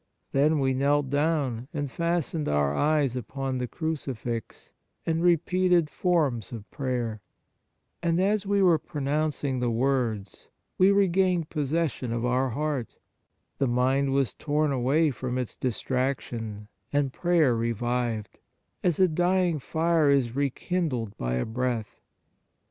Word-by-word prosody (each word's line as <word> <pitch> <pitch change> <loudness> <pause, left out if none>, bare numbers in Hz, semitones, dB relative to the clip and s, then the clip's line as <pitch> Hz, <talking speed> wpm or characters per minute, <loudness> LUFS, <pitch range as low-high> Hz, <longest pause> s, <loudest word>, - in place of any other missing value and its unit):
Then 150 +3 +3
we 135 -2 +1
knelt 140 +1 +1
down 145 -5 0
and 145 -3 -2
fastened 170 -2 -1
our 70 -1 +2
eyes 145 - +2
upon 130 +1 -3
the 125 - -2
Crucifix 130 -7 -4 0.3
and 165 0 0
repeated 175 -1 +3
forms 145 - 0
of 110 -3 -8
prayer, 125 -6 -2 0.8
and 170 0 +1
as 200 +2 +2
we 200 -1 +2
were 170 -4 +5
pronouncing 145 -3 -1
the 125 -1 0
words, 115 -4 -1 0.3
we 190 +2 +6
regained 185 -4 +2
possession 150 -4 -1
of 115 +1 -1
our 130 +2 +1
heart, 145 -1 -2 0.6
the 135 - +2
mind 130 +3 +2
was 135 -2 +1
torn 150 0 0
away 140 +5 +2
from 125 -1 -4
its 125 -3 -3
distrac 130 +2 -1
tion, 110 -3 -7 0.2
and 145 -2 +1
prayer 170 -8 +3
revived, 115 -1 -2 0.4
as 175 -2 +1
a 185 - +6
dying 175 0 +1
fire 160 +1 +2
is 130 -4 +2
rekindled 140 - -1
by 60 0 -2
a 60 - 0
breath. 120 -1 -3
140 Hz, 130 wpm, -27 LUFS, 125-160 Hz, 0.8 s, we